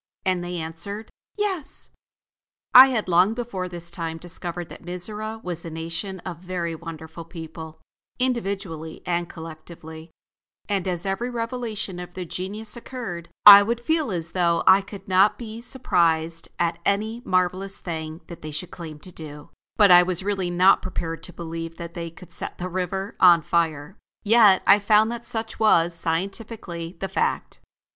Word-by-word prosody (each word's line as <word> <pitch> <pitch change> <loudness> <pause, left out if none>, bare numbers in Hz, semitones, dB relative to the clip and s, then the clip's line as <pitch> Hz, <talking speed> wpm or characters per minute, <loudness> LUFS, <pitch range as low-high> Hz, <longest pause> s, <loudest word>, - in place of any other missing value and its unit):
And 185 -2 +1
they 175 0 -4
answered: 170 +7 -5 0.3
"Yes." 385 -8 -3 0.8
I 260 +2 +11
had 240 -7 -1
long 180 +5 +4
before 200 -7 -4
this 170 -1 -5
time 165 -1 -4
discovered 175 0 -6
that - - -11
Mizora 210 +5 -5
was 175 -2 -5
a 165 - -6
nation 165 +4 -5
of 175 -3 -6
very 175 -2 -3
wonderful 160 0 -8
people, 160 -1 -9 0.4
individually 195 -10 -3
and 175 -1 -1
collectively; 160 0 -10 0.6
and 195 -3 -1
as 180 0 -2
every 195 +6 -1
revelation 230 -5 -4
of 180 0 -9
their 185 -1 -4
genius 205 +6 -5
occurred, 230 -9 -7 0.2
I 200 -1 +13
would 230 +3 -1
feel 315 +3 0
as 170 -2 -1
though 170 -2 +2
I 190 +1 +7
could 195 0 -11
not 190 +2 +4
be 225 -1 -8
surprised 165 -10 0
at 170 0 0
any 215 +5 0
marvelous 185 -1 0
thing 160 -1 -5
that 170 - -11
they 155 - -6
should 155 +4 -5
claim 160 -3 -8
to 185 - -11
do, 150 -3 -10 0.3
but 205 -3 +7
I 175 0 +10
was 180 0 0
really 195 -3 -1
not 180 +2 +5
prepared 165 -3 -4
to 180 - -9
believe 165 -1 -6
that 170 0 -7
they 170 0 -5
could 165 +1 -15
set - - -6
the 180 +1 -4
river 185 +2 -3
on 175 -3 +7
fire. 160 +2 -1 0.3
Yet 215 -3 +6
I 205 - +7
found 215 +2 +4
that 235 0 -6
such 225 -1 -4
was, 175 -6 +4
scientifically, 175 0 -4
the 195 - -2
fact. 190 - -2
180 Hz, 165 wpm, -24 LUFS, 165-205 Hz, 0.8 s, I